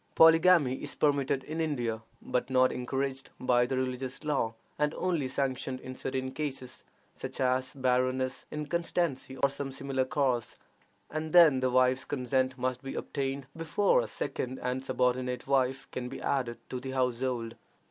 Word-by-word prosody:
Polygamy 165 -4 +6
is 145 - -5
permitted 140 -2 +1
in 160 +4 -3
India, 120 -8 -1 0.2
but 125 - -1
not 130 0 +4
encouraged 135 +1 -3
by 125 -1 +3
the 130 0 -1
religious 130 +2 -3
law, 135 -7 0 0.2
and 150 +1 +1
only 170 -7 0
sanctioned 130 -1 -2
in 130 0 -8
certain 130 0 -3
cases, 135 -3 -5 0.3
such - - -7
as 130 +1 +1
barrenness, 130 0 0
inconstancy, 150 -3 -2
or 140 - +4
some 140 0 -4
similar 135 0 -1
cause, 130 -3 0 0.6
and 155 0 -3
then 165 -7 +8
the 130 0 +1
wife's 130 +1 +3
consent 130 -1 0
must 130 0 -1
be 135 -1 -6
obtained 135 -1 -3
before 165 - +2
a - - -4
second 130 +1 -3
and 125 +1 -1
subordinate 125 -1 0
wife 135 -1 +1
can 125 -1 -4
be - - -7
added 125 -4 -1
to 125 - -4
the 130 - -6
household. 125 -2 -1
130 Hz, 155 wpm, -30 LUFS, 130-140 Hz, 0.6 s, then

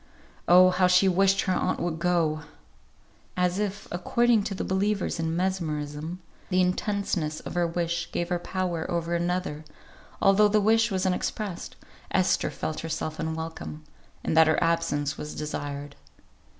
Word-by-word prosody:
Oh! 185 +1 +7
how 180 0 +3
she 180 +2 +5
wished 195 +1 +3
her 185 - 0
aunt - - 0
would 165 -2 -2
go. 170 -3 +1 1.0
As 180 +1 +1
if, 205 -1 -3
according 230 +6 +2
to 195 - -3
the - - -3
believers 195 -1 0
in 165 0 -1
mesmerism, 160 -3 -2 0.3
the 185 -1 +2
intenseness 180 -4 0
of - - -7
her 175 -1 +1
wish 170 0 -2
gave 175 0 -2
her 175 -1 0
power 175 -2 -3
over 170 0 -1
another, 170 -3 -1 0.6
although 195 +2 +5
the 210 +1 +3
wish 225 +2 +3
was 190 -2 -1
unexpressed, 185 0 -2 0.3
Esther 185 - +2
felt 155 - -4
herself 155 -1 -4
unwelcome, 160 -1 -5 0.4
and - - -1
that 160 0 +7
her 155 - +3
absence 165 -3 0
was 150 - -6
desired. 145 -1 -5
175 Hz, 150 wpm, -27 LUFS, 160-190 Hz, 1.0 s, Oh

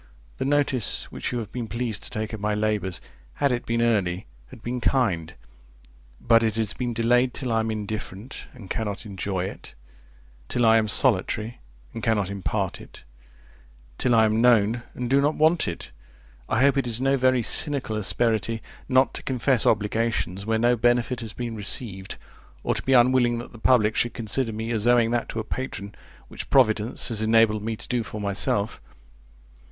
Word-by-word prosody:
The 130 - -1
notice 140 -4 0
which - - -4
you 125 - -2
have 110 -3 -5
been 120 -2 -4
pleased 115 -2 -3
to - - -8
take 110 +1 -4
of 110 - -5
my 105 +1 -1
labours, 105 -4 -1 0.3
had 140 -2 +1
it 120 0 -2
been 115 0 +1
early, 95 -6 0 0.2
had 110 - -14
been 125 +1 -3
kind; 90 -12 0 0.8
but 115 0 +4
it 110 -2 0
has 110 -3 -1
been 125 -1 -3
delayed 120 +2 +2
till 130 -4 -3
I 115 - +2
am 110 0 -1
indifferent, 110 +1 -6
and 110 -7 -11
cannot 105 -1 -4
enjoy 95 -2 -3
it: 95 - -9 0.7
till 120 - +1
I 110 0 +6
am 110 -1 +1
solitary, 110 0 +1 0.3
and 115 - -6
cannot 105 -4 0
impart 100 -2 -3
it; - - -14 1.0
till 125 -2 +3
I 110 -1 +5
am 110 +1 +1
known, 115 -1 +4
and 125 - -3
do 135 +3 +3
not 150 +2 +1
want 160 +2 +3
it. 85 - -6 0.6
I 115 - +1
hope 140 +1 +4
it 135 -3 0
is 115 -1 -1
no 135 +1 +2
very 130 -2 +2
cynical 140 -4 +3
asperity 110 0 0 0.3
not 130 0 +3
to - - -6
confess 130 -2 +1
obligations 105 -2 0
where 110 0 +2
no 120 +2 +3
benefit 120 +1 +1
has 110 -2 -6
been 120 -2 -5
received, 100 -2 -3 0.5
or - - +1
to - - -3
be 135 - +1
unwilling 120 -1 +4
that 120 - -7
the 115 - -13
public 110 -3 +3
should 120 -1 0
consider 115 +2 -1
me 110 +2 -4
as 110 0 0
owing 120 -2 +4
that 120 -1 -1
to 115 - -4
a - - -2
patron, 105 -4 -5 0.3
which - - -8
providence 115 -3 +2
has 110 -2 0
enabled 110 -1 +3
me 110 +1 -3
to - - -11
do 125 -1 0
for 110 -1 -7
myself. 100 +1 -1
115 Hz, 185 wpm, -25 LUFS, 105-125 Hz, 1.0 s, I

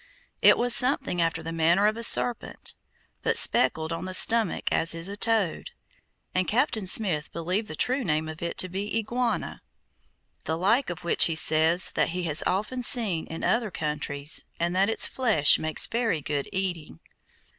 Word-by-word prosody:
It - - +5
was 245 0 +3
something 250 -8 +1
after 165 -1 -2
the 165 - -7
manner 165 +4 +1
of 215 +1 0
a 230 - -8
serpent, 235 +1 +1 0.5
but - - 0
speckled 160 +1 +3
on 165 - -7
the 185 0 0
stomach 225 -1 +3
as 165 0 0
is 165 +2 -3
a 200 - -6
toad, 215 -4 -1 0.6
and 185 0 -2
Captain 230 -4 -1
Smith 180 -7 +2
believed 180 +6 -4
the 155 - -9
true 255 - 0
name 155 -3 -2
of 160 0 -10
it 170 - -6
to 185 - +1
be 200 +4 -5
Iguana, 235 +2 -4 0.8
the 160 - -3
like 220 +9 0
of 175 - -8
which 170 - +4
he 165 - -1
says 160 +3 +4
that - - -1
he 180 +1 -5
has 155 -2 -1
often 210 +7 -3
seen 215 -9 +1
in 165 - -9
other 230 -2 -1
countries 150 -3 -2
and 170 +1 -2
that 195 +3 +1
its 225 - +3
flesh 220 - +3
makes 155 -1 +1
very 230 -8 -2
good 145 -1 -5
eating. 180 - -5
180 Hz, 175 wpm, -24 LUFS, 160-225 Hz, 0.8 s, It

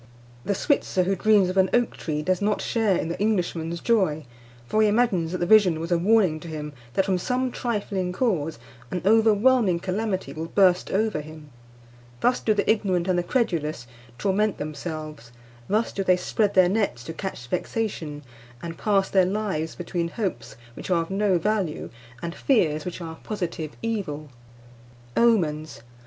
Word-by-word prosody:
The 200 - -1
Switzer 190 -7 +1
who 195 +2 0
dreams 205 0 +4
of 185 - -3
an 190 -1 +4
oak 240 -1 +1
tree 150 -2 -3
does 185 +3 0
not 210 0 +1
share 220 -6 +1
in 160 - -2
the 170 - -4
Englishman's 175 -5 -1
joy; 185 -10 +1 0.4
for 215 - +1
he 215 - +5
imagines 205 -7 +2
that 185 - -2
the 175 - -1
vision 185 -5 +5
was 165 +2 -5
a 175 - +4
warning 190 -4 +3
to 170 - -10
him 150 -2 -6 0.2
that, 195 - +3
from 190 -2 +1
some 255 +6 -1
trifling 200 -7 -2
cause, 180 - -1 0.3
an 180 - -3
overwhelming 220 -2 +4
calamity 190 +2 -2
will 160 +1 -5
burst 180 0 +3
over 210 -5 0
him. 155 -1 -12 0.7
Thus 245 - +2
do 215 - +1
the 200 - 0
ignorant 190 -5 +1
and 180 -1 +2
the - - +2
credulous 165 - -1 0.3
torment 200 - +1
themselves; 155 -4 -6 0.4
thus 215 +3 +1
do 195 - -2
they 185 -1 +4
spread 205 +3 0
their 185 -1 +6
nets 195 - 0
to 165 - -6
catch 190 -8 -6
vexation, 165 - -3 0.4
and 165 -1 -6
pass 200 -2 +2
their 190 -2 +3
lives 190 -5 -2
between 175 -1 -3
hopes 170 - -4 0.2
which - - -8
are 170 -2 +2
of 165 - -11
no 195 -1 +2
value 190 -3 -1 0.3
and 170 0 -3
fears 160 - +1
which 180 0 -5
are 165 -1 -5
a - - -17
positive 170 -7 -4
evil. 185 -10 -3 0.9
OMENS. 160 - +1
185 Hz, 175 wpm, -25 LUFS, 165-210 Hz, 0.9 s, their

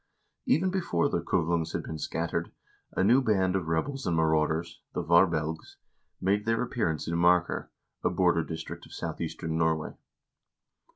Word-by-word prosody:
Even 180 +6 +3
before 170 -6 +1
the 85 - 0
Kuvlungs 85 -1 0
had - - -2
been 80 - -6
scattered, 85 +1 -2 0.5
a - - +3
new 120 +7 +5
band 95 -6 +2
of 90 -4 -1
rebels 130 - -1
and 85 -2 +1
marauders, 80 +1 +1
the - - -2
"Varbelgs," 80 -2 +2 0.4
made 100 +3 +1
their 115 +2 +1
appearance 105 -11 -1
in 85 - -1
Marker, 90 +1 +2 0.3
a - - +3
border 90 -3 +2
district 80 0 -7
of - - -15
southeastern 80 0 -4
Norway. 80 -1 0
85 Hz, 150 wpm, -28 LUFS, 80-105 Hz, 0.5 s, new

